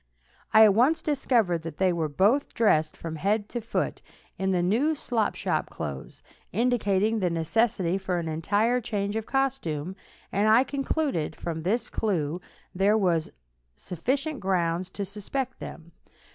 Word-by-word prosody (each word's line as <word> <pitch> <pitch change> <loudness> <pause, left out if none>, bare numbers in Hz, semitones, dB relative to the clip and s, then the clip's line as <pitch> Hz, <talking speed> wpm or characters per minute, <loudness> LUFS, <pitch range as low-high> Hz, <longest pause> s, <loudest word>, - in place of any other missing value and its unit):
I 220 - +8
at 210 -2 +7
once 280 - +3
discovered 235 - +1
that 160 -2 -7
they 185 -2 +2
were 160 -2 -1
both 205 - +2
dressed 155 -9 +2
from 160 -1 -6
head 205 +5 0
to 240 - -4
foot 225 - -2 0.4
in 190 0 0 0.2
new 275 +11 +2
slop 230 -6 -1
shop - - -1
clothes, - - -7 0.3
indicating 220 -3 +1
the 180 -3 +1
necessity 185 +2 +1
for 190 -2 -2
an 170 -1 -3
entire 205 +10 +1
change 205 -3 -2
of 220 -1 -3
costume, 190 - -1 0.4
and 205 +2 +2
I 230 +4 +6
concluded 275 - -2
from 165 -2 -4
this 210 +9 0
clue 175 -5 -1 0.3
there 200 +4 +3
were 180 -5 +3 0.6
sufficient 265 - -2
grounds 180 -2 0
to 200 +1 -5
suspect 240 +7 -4
them. 165 +1 -9
200 Hz, 145 wpm, -27 LUFS, 170-240 Hz, 0.6 s, I